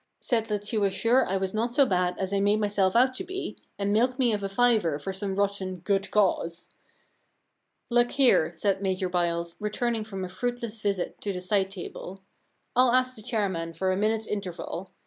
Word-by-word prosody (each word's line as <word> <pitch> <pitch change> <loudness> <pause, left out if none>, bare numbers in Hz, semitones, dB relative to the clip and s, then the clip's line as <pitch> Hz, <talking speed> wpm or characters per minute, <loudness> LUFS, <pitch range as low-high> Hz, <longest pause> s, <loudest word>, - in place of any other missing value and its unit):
Said 225 -3 0
that 205 -1 -2
she 215 +1 0
was 195 -2 +1
sure 245 +5 +3
I 195 - 0
was 190 0 -2
not 235 +3 -1
so 280 - +6
bad 180 -4 0
as 190 +1 -2
I 200 - +2
made 205 +2 +3
myself 205 -2 +1
out 255 +2 +5
to 315 - -4
be, 375 +1 -5 0.2
and 200 0 0
milked 250 +4 +2
me 245 -4 +3
of 205 - -1
a 195 - -3
fiver 215 -8 +2
for 170 +6 -5
some 195 0 -3
rotten 200 -2 -1
" - - -32
good 195 0 +1
cause." 180 -4 +1 1.2
Look 240 0 +4
here,* 255 - +4
said 195 +3 0
Major 190 -1 -1
Byles, 170 -1 -1
returning 220 +2 -1
from 195 -3 -5
a - - -5
fruitless 230 +3 -4
visit 200 -4 -2
to 205 - -2
the 185 - -4
side 190 +1 +1
table, 190 0 -8 0.2
* - - -45
I'll 250 0 +5
ask 255 0 +2
the 215 - -11
chairman 190 -7 -2
for 185 +3 0
a - - +1
minute's 220 +2 0
interval. 190 -2 -5
200 Hz, 205 wpm, -27 LUFS, 190-230 Hz, 1.2 s, so